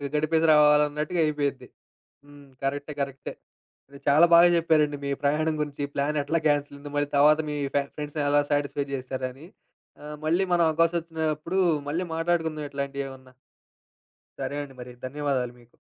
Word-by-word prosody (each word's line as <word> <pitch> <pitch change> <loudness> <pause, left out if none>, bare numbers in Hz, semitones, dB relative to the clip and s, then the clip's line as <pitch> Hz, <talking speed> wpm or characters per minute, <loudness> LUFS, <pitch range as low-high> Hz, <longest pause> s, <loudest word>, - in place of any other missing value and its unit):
గడిపేసి 160 +2 +2
రావాలన్నట్టుగా 150 +2 +3
అయిపోయిద్ది. 145 -3 -2 0.6
హ్మ్. 145 -1 -16 0.2
కరెక్టే. 145 +2 -3
కరెక్టే. 135 -1 -5 0.6
అది. 140 - -12
చాలా 150 +4 +7
బాగా 170 +1 +8
చెప్పారండి 155 -3 +2
మీ - - -2
ప్రయాణం 155 +2 +1
గురించి 145 -1 -4
ప్లాన్ 145 +2 0
ఎట్లా 165 +4 0
క్యాన్సిల్ 145 -1 0
అయింది. 145 0 -10
మళ్ళీ 145 0 0
తర్వాత 150 +2 +6
మీ 150 - -3 0.4
ఫ్రెండ్స్‌ని 150 0 -4
ఎలా 145 0 +4
సాటిస్ఫై 145 -1 0
చేశారని. 130 +2 -6 0.6
ఆహ్, 150 0 -7
మళ్ళీ 170 +4 +2
మనం 175 -1 +4
అవకాశం 165 +2 +2
ఒచ్చినప్పుడు 160 +2 -2 0.3
మళ్ళీ 165 +5 -1
మాట్లాడుకుందాం 165 -2 -1
ఇట్లాంటియేవన్నా. 140 -2 -6 1.1
సరే - - -3
అండి 135 -2 -12
మరి. 125 0 -9
ధన్యవాదాలు 130 -2 -2
మీకు. 120 - -25
145 Hz, 140 wpm, -26 LUFS, 140-155 Hz, 1.1 s, బాగా